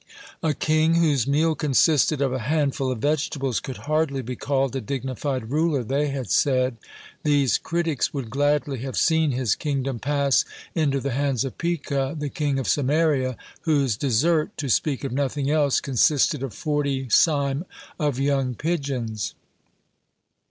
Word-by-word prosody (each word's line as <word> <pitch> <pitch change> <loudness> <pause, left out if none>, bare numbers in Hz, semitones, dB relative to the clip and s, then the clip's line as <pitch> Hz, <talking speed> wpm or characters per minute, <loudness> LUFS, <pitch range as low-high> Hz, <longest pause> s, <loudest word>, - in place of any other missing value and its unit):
A 155 -3 0
king 155 +1 +2
whose 150 -7 +2
meal 155 +3 +2
consisted 150 0 +2
of 135 -2 0
a 130 - -1
handful 140 -4 +1
of 125 - -2
vegetables 140 -4 0
could 130 -3 -7
hardly 150 -3 0
be 125 +2 -5
called 135 0 -1
a 135 - -2
dignified 130 -1 -3
ruler, 150 -3 +1
they 140 +6 0
had 135 -3 -4
said. 130 -3 +2 0.4
These 145 -4 +2
critics 165 -4 -1
would 130 -6 -5
gladly 145 -1 +1
have 130 +2 -5
seen 160 -2 +3
his 125 -5 +1
kingdom 135 -4 -2
pass 140 0 +2 0.3
into 145 -4 +1
the 140 - -2
hands 135 0 0
of 135 - -7
Pekah, 140 -4 -1
the 150 -1 -3
king 145 -1 -1
of 135 - -2
Samaria, 145 -3 +1 0.2
whose 140 - +1
dessert, 150 +7 +1
to 140 - -3
speak 140 +4 +1
of 135 - -3
nothing 140 +1 -1
else, 145 -3 +3
consisted 140 +1 +2
of 135 -3 -4
forty 145 -3 -1
seim 140 - +2 0.3
of 145 -5 0
young 135 -2 0
pigeons. 135 - -3
140 Hz, 150 wpm, -24 LUFS, 130-150 Hz, 0.4 s, seen